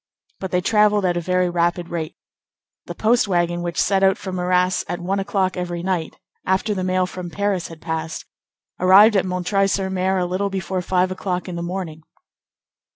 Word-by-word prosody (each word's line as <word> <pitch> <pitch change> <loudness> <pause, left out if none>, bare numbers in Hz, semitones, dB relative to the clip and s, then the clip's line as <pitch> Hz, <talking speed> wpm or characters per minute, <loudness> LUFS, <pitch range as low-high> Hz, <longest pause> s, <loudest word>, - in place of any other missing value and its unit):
But 190 - -4
they 180 0 +1
travelled 210 0 +3
at 175 -1 +1
a 175 - -1
very 180 +1 +1
rapid 175 0 0
rate. 160 -2 -4 0.7
The - - -6
post 230 +1 +2
wagon 175 -2 0
which 175 -1 -3
set 195 -1 +2
out 190 -1 +4
from 185 -1 -5
Arras 180 +1 +1
at 175 - -3
one 190 +3 -1
o'clock 195 -1 0
every 175 -1 -4
night, 180 -4 -2 0.3
after 190 +3 0
the 185 -2 -3
mail 185 0 +1
from 180 -1 -7
Paris 200 -1 -1
had 165 -1 -12
passed, 160 0 -4 0.5
arrived 200 +4 +7
at 190 - +2
M. 180 -1 -3 0.2
sur 195 0 0
M. 190 0 -3
a 185 0 +1
little 185 +3 -1
before 190 -1 -3
five 185 +1 +1
o'clock 185 -1 -3
in 180 - -5
the 170 - -4
morning. 170 -3 -5
185 Hz, 190 wpm, -21 LUFS, 175-190 Hz, 0.7 s, arrived